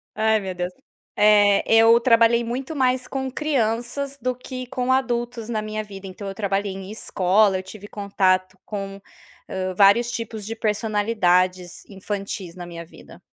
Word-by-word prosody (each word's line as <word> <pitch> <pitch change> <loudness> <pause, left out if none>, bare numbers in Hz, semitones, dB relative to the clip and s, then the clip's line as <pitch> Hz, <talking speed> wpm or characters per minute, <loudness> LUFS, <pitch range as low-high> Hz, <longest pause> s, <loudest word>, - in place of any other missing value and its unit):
Ai, 220 0 +2
meu 190 -1 -4
Deus! 180 0 -4 0.4
Eh, 205 -1 +5
eu 225 +1 +6
trabalhei 235 -1 +4
muito 260 +6 -4
mais 255 -2 +1
com 265 -1 -3
crianças 270 0 -1
do 255 +1 -1
que 255 0 -7
com 250 0 -1
adultos 240 -3 -1
na 220 -2 -1
minha 215 0 -4
vida, 195 -2 -11
então 190 +2 -8
eu 195 - -6
trabalhei 200 0 -1
em 190 +1 -8
escola, 195 -1 +2
eu - - -7
tive 205 +2 -11
contato 190 -2 0
com 195 -1 -6 0.7
vários, 200 +5 +5
hã, - - -4
tipos 225 -3 -5
de 225 +2 -5
personalidades 205 -5 0
infantis 195 -2 -5
na 175 -1 -8
minha 170 -1 -8
vida. 165 - -16
215 Hz, 155 wpm, -23 LUFS, 195-235 Hz, 0.7 s, eu